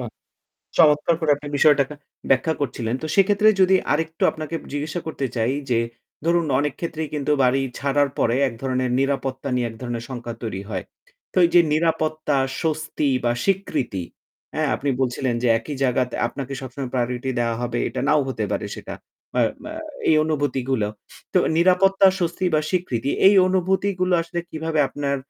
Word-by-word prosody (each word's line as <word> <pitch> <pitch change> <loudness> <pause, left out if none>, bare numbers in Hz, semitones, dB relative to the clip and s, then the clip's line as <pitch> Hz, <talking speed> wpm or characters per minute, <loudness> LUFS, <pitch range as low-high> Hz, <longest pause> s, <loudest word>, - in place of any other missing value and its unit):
বাহ! - - -4 0.7
চমৎকার 150 +2 +5
করে 160 -2 +2
আপনি 145 0 -9
বিষয়টাকে 145 -1 +4 0.4
ব্যাখ্যা 135 +5 +3
করছিলেন। 120 -4 -2
তো - - -4
সেক্ষেত্রে 205 +2 +5
যদি 190 0 +5 0.2
আরেকটু 160 +2 -1
আপনাকে 155 +1 -5 0.2
জিজ্ঞাসা 150 +4 -3
করতে 145 -3 -3
চাই 115 +3 +1 0.2
যে, 120 -2 +3 0.5
ধরুন 170 0 +2
অনেক 145 -1 0
ক্ষেত্রেই 160 -2 -4
কিন্তু 145 0 -1
বাড়ি 130 +2 +3 0.2
ছাড়ার 140 0 +1
পরে 115 +2 +2
এক 120 - -5
ধরণের 130 -1 -1
নিরাপত্তা 135 -1 -1
নিয়ে 125 -1 0
এক 115 - -11
ধরনের 120 -2 -4
শঙ্কা 120 -2 -5
তৈরি 95 -4 -4
হয়। 95 -4 -3 0.5
তো - - -5
এই - - +1
যে 175 - +9
নিরাপত্তা 155 -2 0 0.3
স্বস্তি 155 -2 -1 0.2
বা 120 - +3
স্বীকৃতি, 135 - -1 0.5
হ্যাঁ - - 0
আপনি 140 - -2
বলছিলেন 125 -1 0
যে - - +3
একই 145 +6 -6
জায়গাত 125 -1 +1 0.2
আপনাকে 135 +2 -6
সবসময় 130 0 -6
প্রায়োরিটি 125 +1 -1
দেওয়া 115 -1 0
হবে 120 0 -2
এটা - - -4
নাও 150 0 +4
হতে 110 -5 -2
পারে - - -1
সেটা। - - -8 0.4
আ - - +4 0.2
মা 310 - -7 0.4
এই 160 - +5
অনুভূতিগুলো। 135 -7 0 0.5
তো - - +5 0.2
নিরাপত্তা 190 +3 +5
স্বস্তি 175 +1 -1
বা 150 - +3
স্বীকৃতি 155 -10 -1 0.2
এই 200 - +6
অনুভূতিগুলো 185 0 +1
আসলে 170 +1 -4
কিভাবে 160 0 -2
আপনার 140 0 -2
145 Hz, 165 wpm, -22 LUFS, 125-165 Hz, 0.7 s, যে